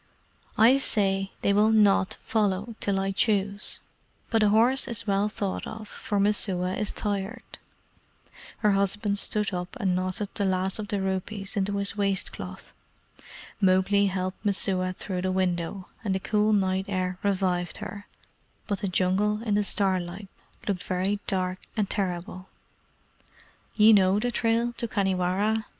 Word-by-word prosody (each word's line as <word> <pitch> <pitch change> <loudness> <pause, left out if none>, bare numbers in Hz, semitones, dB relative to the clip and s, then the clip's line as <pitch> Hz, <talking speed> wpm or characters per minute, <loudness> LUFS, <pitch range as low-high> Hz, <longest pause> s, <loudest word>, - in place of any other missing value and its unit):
"I 245 +5 +6
say 195 -6 +1
they 200 - +3
will 210 +2 +4
NOT 205 -3 +4
follow 210 0 0
till 195 -1 0
I 195 0 0
choose; 200 0 0 0.5
but 225 -1 +3
a 210 - +5
horse 240 +6 +3
is 230 -2 -4
well 200 0 +1
thought 200 -2 -3
of, 220 -1 -7
for 205 -1 -3
Messua 190 -3 +1
is 210 - -2
tired." 205 +2 -4 1.1
Her 210 - +6
husband 200 +1 +1
stood 210 -1 0
up 180 +4 -4
and 190 -5 +1
knotted 185 +2 -2
the 205 - -1
last 190 +1 0
of 210 - -4
the 205 -3 -1
rupees 195 +1 -3
into 200 0 0
his 200 0 -2
waist 195 -2 0
cloth. - - -9 0.9
Mowgli 195 +1 +4
helped 185 0 -3
Messua 190 -2 +1
through 185 -1 -4
the 185 0 0
window, 185 0 -1 0.2
and 195 -3 0
the - - 0
cool 210 +2 +1
night 190 -2 +1
air 185 -2 -2
revived 185 -3 0
her, 205 +1 -8 0.6
but 200 -3 -2
the 200 - -2
Jungle 195 +4 +1
in 215 -3 0
the 205 0 +3
starlight 190 -1 -1 0.4
looked 195 -3 -1
very 190 +3 -1
dark 185 -1 -1 0.2
and 210 -2 +1
terrible. 185 -1 -3 1.3
"Ye 220 +1 +7
know 190 -1 +4
the 245 +3 0
trail 230 +1 +1
to 235 - -2
Khanhiwara?" 200 +2 0
200 Hz, 150 wpm, -27 LUFS, 185-210 Hz, 1.3 s, Ye